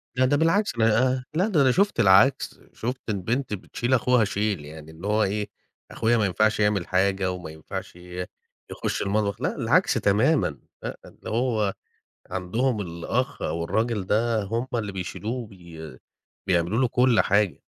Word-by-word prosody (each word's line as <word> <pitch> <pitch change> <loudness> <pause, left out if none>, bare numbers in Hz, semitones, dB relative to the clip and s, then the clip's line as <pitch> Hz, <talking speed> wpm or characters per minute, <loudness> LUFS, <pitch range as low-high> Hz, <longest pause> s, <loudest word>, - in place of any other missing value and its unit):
لا 130 +1 +3
ده 145 +3 +2
بالعكس، 180 - +2
أنا 125 +3 +2
لأ 185 +6 +2
ده 180 -9 +2
أنا 130 -2 +5
شُفت 200 - +1
العكس. 105 +7 +4
شُفت 125 +3 -4
البنت 110 +5 -1
بتشيل 120 +5 -3
أخوها 125 -2 +3
شيل، 100 -5 -2
يعني 80 +1 -11
اللي 80 +5 -8
هو 105 +1 +2
إيه، 105 +1 -1 0.4
أخويا 120 +1 +2
ما 110 - +2
ينفعش 110 +3 +1
يعمل 105 -3 +1
حاجة 95 0 +1
وما 90 -3 -7
ينفعش 80 +2 -7
ي 90 +1 -7 0.5
يخُش - - -3
المطبخ 100 0 -1
لأ، - - -1
العكس - - +2
تمامًا 105 - +2 0.2
لأ، - - -5
اللي - - -11
هو 110 -4 0 0.6
عندهم 110 +5 -1
الأخ 85 -2 -3
أو 85 0 -2
الراجل 110 +3 0
ده 110 +1 +1
هم 115 +5 -2
اللي 105 -3 -2
بيشيلوه 95 +4 -5
وبي 90 -10 -9 0.5
بيعملوا 90 +4 +1
له 130 - +3
كل 125 -1 +3
حاجة 100 -1 +1
105 Hz, 160 wpm, -25 LUFS, 95-125 Hz, 0.6 s, أنا